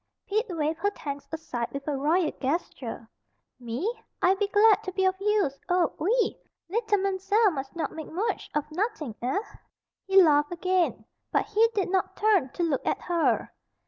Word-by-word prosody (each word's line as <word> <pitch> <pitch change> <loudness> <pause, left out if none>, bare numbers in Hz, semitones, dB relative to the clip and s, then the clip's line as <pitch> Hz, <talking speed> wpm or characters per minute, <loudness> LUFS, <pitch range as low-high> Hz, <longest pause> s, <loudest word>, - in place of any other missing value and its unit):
Pete 435 +4 0
waved 320 -2 -1
her 405 - +2
thanks 285 -8 -7
aside 260 -7 -4
with 275 +1 -6
a 295 - 0
royal 310 +4 +2
gesture. 260 -5 -3 0.5
"Me! 295 - -3 0.2
I 365 - +4
be 400 +1 0
glad 415 +1 +5
to 375 - -3
be 380 +1 0
of 375 - +4
use, 405 -10 +1
oh, 355 -2 +2
oui! 460 +8 +1 0.3
Leetle 435 +1 +1
Man'zelle 390 +2 +2
mus' 270 -2 -6
not 330 - -2
make 315 -1 -7
mooch 385 +8 -2
of 300 - +1
nottin', 360 - -2
eh?" 255 +10 0 0.7
He 390 0 +6
laughed 295 -1 +3
again, 365 0 0 0.3
but - - +2
he 430 +2 +3
did 385 -3 0
not 380 -1 0
turn 410 -10 +3
to 350 - -2
look 305 -6 0
at - - 0
her. 340 -2 +1
360 Hz, 175 wpm, -27 LUFS, 295-410 Hz, 0.7 s, He